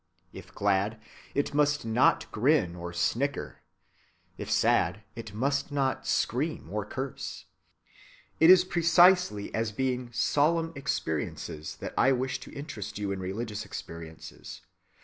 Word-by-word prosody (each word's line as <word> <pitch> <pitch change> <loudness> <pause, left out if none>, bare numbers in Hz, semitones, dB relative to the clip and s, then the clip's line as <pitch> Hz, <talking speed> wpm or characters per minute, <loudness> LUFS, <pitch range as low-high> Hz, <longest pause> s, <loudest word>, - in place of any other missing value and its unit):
If - - -11
glad, 100 +2 +1 0.4
it 140 +1 0
must 145 -2 +2
not 115 +3 +3
grin 110 - +2
or 85 0 -6
snicker; 130 +11 -1 0.7
if - - -7
sad, 105 - +2
it 115 -2 -7
must 140 +5 0
not 135 -2 -1
scream 135 - -1
or 105 0 -2
curse. 130 +2 -6 0.9
It 160 - +7
is 185 0 +8
precisely 175 - +4
as 115 0 -1
being 125 +1 -2
solemn 165 +7 +1
experiences 80 - -3
that - - -5
I 135 - +5
wish 130 +1 -2
to 130 - -11
interest 110 - -7
you 100 -1 -2
in 95 - -3
religious 105 +3 -4
experiences. 80 -5 -9
125 Hz, 130 wpm, -28 LUFS, 105-145 Hz, 0.9 s, is